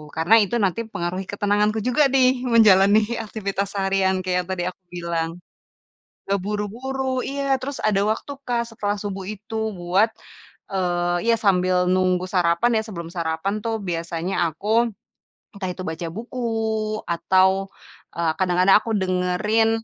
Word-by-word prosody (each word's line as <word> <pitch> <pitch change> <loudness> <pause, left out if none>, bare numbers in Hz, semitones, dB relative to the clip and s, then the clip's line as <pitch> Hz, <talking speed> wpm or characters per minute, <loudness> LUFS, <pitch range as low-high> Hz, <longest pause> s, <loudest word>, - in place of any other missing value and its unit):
karena 165 +7 +4
itu 205 - -2
nanti 195 +3 +1
pengaruhi 185 -3 -4
ketenanganku 205 +2 +1
juga 250 +5 +3
nih 255 -1 +3
menjalani 210 -3 +6 0.2
aktivitas 200 -2 -3
seharian 195 -1 +1
kayak 180 -1 0
yang - - -22
tadi 175 - -3
aku 185 - -15
bilang. 170 -2 -2 1.0
Terburu-buru, 220 +7 -2
iya, 275 -1 0
terus 275 +1 -5
ada 210 -2 +2
waktu, 220 +6 -2 0.2
Kak, 240 -1 +1
setelah 205 -2 -2
subuh 200 -2 -5
itu 215 +1 -7 0.2
buat, 185 +5 +3 0.6
eee, 175 -2 0 0.2
ya - - +4
sambil 185 -3 +2
nunggu 185 0 +2
sarapan 180 +6 +2
ya, - - 0
sebelum 170 -5 -7
sarapan 170 +4 -2
tuh 225 -1 -1
biasanya 170 0 -3
aku, 215 +9 +1 0.7
entah 195 -2 -4
itu 185 +1 -7
baca 160 +1 -4
buku 240 +2 -4 0.6
atau, 190 +3 +2 0.5
eee, 170 -2 +1
kadang-kadang 185 +1 +4
aku 230 - -5
dengerin, 190 +4 +1
195 Hz, 135 wpm, -23 LUFS, 180-220 Hz, 1.0 s, menjalani